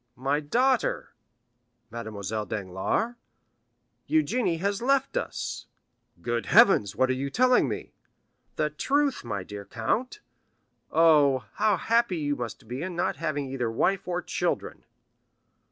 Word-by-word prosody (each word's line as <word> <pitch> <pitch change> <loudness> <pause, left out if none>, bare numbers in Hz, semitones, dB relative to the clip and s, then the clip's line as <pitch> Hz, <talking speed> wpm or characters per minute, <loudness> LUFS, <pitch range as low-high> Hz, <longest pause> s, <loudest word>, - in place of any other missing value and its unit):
"My 135 +3 0
daughter——" 245 - +1 0.8
"Mademoiselle 110 -2 -4
Danglars?" 95 - -2 1.0
"Eugénie 165 - +1
has 200 +3 -1
left 270 - +1
us!" - - -4 0.6
"Good 120 -1 -2
heavens, 195 - +5
what 130 +3 +2
are - - +2
you 135 +2 -3
telling 255 - +3
me?" - - -5 0.6
"The 150 0 0
truth, 280 - 0
my 100 -5 -4
dear 100 +2 -8
count. 120 - -2 0.7
Oh, 145 -7 +4
how 210 -2 +2
happy 230 -2 +1
you 145 -2 -1
must 120 -1 -7
be 125 +4 -5
in 180 +1 -4
not 175 - -1
having 145 -2 -2
either 130 -3 -2
wife 190 +13 0
or 180 -1 -2
children!" - - -3
150 Hz, 125 wpm, -27 LUFS, -, 1.0 s, heavens